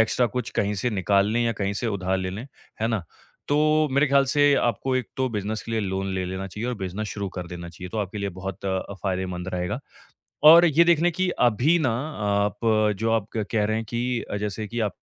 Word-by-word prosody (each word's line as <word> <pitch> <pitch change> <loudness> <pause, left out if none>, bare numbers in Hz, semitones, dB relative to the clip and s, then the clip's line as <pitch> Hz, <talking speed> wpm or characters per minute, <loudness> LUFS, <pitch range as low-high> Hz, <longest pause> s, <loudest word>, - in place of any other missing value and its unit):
Extra 115 +2 +3
कुछ 120 +1 -4
कहीं 105 +1 +1
से 120 +5 -1
निकालने 100 +3 +2
या 115 - +1
कहीं 100 -2 -2
से 110 +4 -3
उधार 95 -3 -1
लें 95 0 -3
लें, 110 +8 -6 0.3
है 115 - +1
ना? 110 -5 -1 0.5
तो 155 +1 +3
मेरे 140 +3 +4
ख़्याल 140 0 +4
से 145 +1 +4
आपको 130 +1 0
एक 125 -5 -2
तो 130 0 +1
बिज़नेस 105 -1 -3
के 115 - -8
लिए 110 - +1
लोन 95 0 -2
ले 95 -1 -1
लेना 95 +1 -4
चाहिए 105 +6 -5
और 125 - -1
बिज़नेस 95 +2 -4
शुरू 100 -1 -4
कर 90 -1 -4
देना 85 0 -7
चाहिए, 90 +2 -9
तो 110 - -5
आपके 105 0 -3
लिए 100 - -2
बहुत 95 +1 -7
अ, 95 +1 -2
फायदेमंद 95 -2 -2
रहेगा। 90 0 -2 0.7
और 170 +3 +10
ये 165 +1 +5
देख 170 -2 +4
लें 175 +1 +3
कि 185 +2 0
अभी 125 +8 +4
ना 130 -7 +1 0.3
आप 100 +2 0
अ, 110 -1 +3
जो 115 +3 -1
आप 110 -2 +1
क 105 - -1
कह 105 -2 +2
रहे 110 +1 0
हैं 115 - -4
कि 120 0 -1
अ, 100 - -1
जैसे 105 +1 -4
कि 120 +3 -4
आप 105 -4 -1
105 Hz, 240 wpm, -25 LUFS, 95-125 Hz, 0.7 s, और